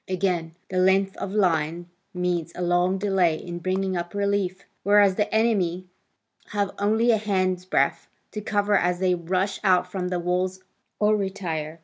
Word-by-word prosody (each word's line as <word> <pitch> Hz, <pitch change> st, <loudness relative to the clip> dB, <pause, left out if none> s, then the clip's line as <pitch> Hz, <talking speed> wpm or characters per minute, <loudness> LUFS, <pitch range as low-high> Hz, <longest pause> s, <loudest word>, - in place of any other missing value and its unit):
Again, 180 Hz, -3 st, -1 dB
the 185 Hz, -, -1 dB
length 190 Hz, +1 st, +3 dB
of 195 Hz, -, -4 dB
line 170 Hz, -3 st, +1 dB, 0.2 s
means 175 Hz, -2 st, -2 dB
a 180 Hz, -, -3 dB
long 175 Hz, +2 st, +2 dB
delay 190 Hz, -5 st, +2 dB
in 175 Hz, +2 st, -7 dB
bringing 185 Hz, +1 st, -1 dB
up 175 Hz, +2 st, -4 dB
relief, 200 Hz, -2 st, -1 dB, 0.2 s
whereas 205 Hz, -1 st, +5 dB
the 210 Hz, +2 st, -1 dB
enemy 185 Hz, -6 st, +1 dB, 0.6 s
have 200 Hz, -2 st, 0 dB
only 220 Hz, +4 st, +3 dB
a 220 Hz, -, +2 dB
handsbreadth 185 Hz, -3 st, 0 dB, 0.2 s
to 210 Hz, -, -5 dB
cover 205 Hz, 0 st, +1 dB
as 180 Hz, -1 st, +2 dB
they 185 Hz, 0 st, +2 dB
rush 185 Hz, +3 st, -1 dB
out 180 Hz, -2 st, +3 dB
from 180 Hz, -2 st, -3 dB
the 180 Hz, 0 st, -1 dB
walls 180 Hz, +2 st, -1 dB, 0.3 s
or 210 Hz, 0 st, +3 dB
retire. 170 Hz, -6 st, -3 dB
185 Hz, 155 wpm, -25 LUFS, 175-200 Hz, 0.6 s, whereas